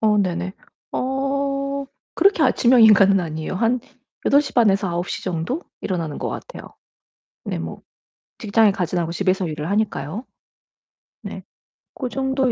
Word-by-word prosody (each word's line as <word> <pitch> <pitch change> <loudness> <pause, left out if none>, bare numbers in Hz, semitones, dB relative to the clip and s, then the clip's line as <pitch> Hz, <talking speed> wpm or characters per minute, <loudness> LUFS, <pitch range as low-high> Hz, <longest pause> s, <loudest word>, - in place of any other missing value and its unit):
어 215 -1 +3
네네. 185 -1 -1 0.4
어 275 +1 -1 0.3
그렇게 385 -2 +4
아침형 245 -1 +5
인간은 200 -2 +7
아니에요. 160 0 -4
한 230 +6 +1 0.4
8:30 265 -6 +4
에서 195 0 0
9:00 175 +1 -3
정도 185 - -2 0.2
일어나는 165 -6 -3
것 - - -3
같아요. - - -8 0.7
네 - - -2
뭐 80 0 -6 0.6
직장에 215 0 +4
가지는 180 -2 -1
않고 165 - -4
집에서 185 +1 0
일을 155 +1 -4
하니까요. 205 - -1 1.0
네. - - -7 0.5
고 255 - -4
정도 265 -1 0
205 Hz, 255 characters per minute, -22 LUFS, 175-265 Hz, 1.0 s, 인간은